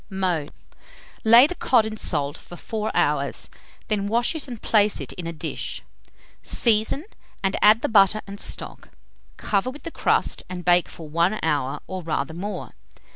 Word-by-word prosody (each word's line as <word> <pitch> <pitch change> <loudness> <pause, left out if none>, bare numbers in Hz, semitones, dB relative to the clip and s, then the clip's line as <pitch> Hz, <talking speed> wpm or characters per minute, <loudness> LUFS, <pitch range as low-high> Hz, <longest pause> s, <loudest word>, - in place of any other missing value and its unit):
Mode. 180 -6 -1 0.7
Lay 230 +4 +8
the 310 - -2
cod 245 -9 +2
in 220 0 -4
salt 145 -8 0
for 175 - -12
4 215 +4 -4
hours, - - 0 0.4
then 205 -2 0
wash 235 +3 +2
it 310 -3 -6
and 240 -4 -7
place 210 -1 +2
it - - -6
in 175 -2 -6
a - - -3
dish; 160 - -5 0.6
season, 230 - +2 0.4
and 190 0 +1
add 215 +2 +6
the - - +2
butter 210 -1 +4
and 200 0 -9
stock; - - -5 0.5
cover 200 +4 0
with 285 +3 -10
the 330 - -6
crust, - - +1
and 180 -1 -7
bake 175 0 +4
for 160 - -10
1 170 +7 +1
hour, 145 -4 -1
or 185 -1 -6
rather 160 -3 -3
more. 200 +5 -6
200 Hz, 170 wpm, -23 LUFS, 175-220 Hz, 0.7 s, Lay